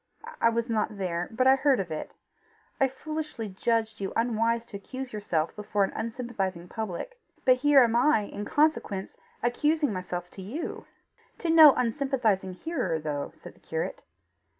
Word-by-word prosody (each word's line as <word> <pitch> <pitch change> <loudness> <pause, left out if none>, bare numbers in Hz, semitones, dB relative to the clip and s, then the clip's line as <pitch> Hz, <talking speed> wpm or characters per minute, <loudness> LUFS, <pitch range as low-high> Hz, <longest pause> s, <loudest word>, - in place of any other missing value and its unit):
I 230 - +6
was 230 +1 -1
not 215 -2 -1
there, 175 -2 -2
but 250 +3 0
I 265 0 +7
heard 270 -2 +3
of 180 -4 -3
it. 155 - -5 0.7
I 270 - +5
foolishly 300 -3 -5
judged 220 +2 -1
you 195 - -2
unwise 230 0 +1
to 215 -4 -8
accuse 255 +5 -7
yourself 170 -7 -1
before 210 -1 0
an 195 - -1
unsympathizing 220 -7 -4
public 220 - -5 0.3
but 255 -1 +6
here 280 0 +6
am 230 -1 +1
I 250 0 +4
in 205 0 -6
consequence 250 -8 0 0.3
accusing 295 +2 +1
myself 180 -1 -5
to 195 - -9
you!" 250 - -5 0.5
"To 335 - -1
no 315 -3 +9
unsympathising 230 -7 0
hearer, 185 - -2
though," 150 -2 -3
said - - -12
the - - -25
curate. - - -4
230 Hz, 160 wpm, -28 LUFS, 195-265 Hz, 0.7 s, no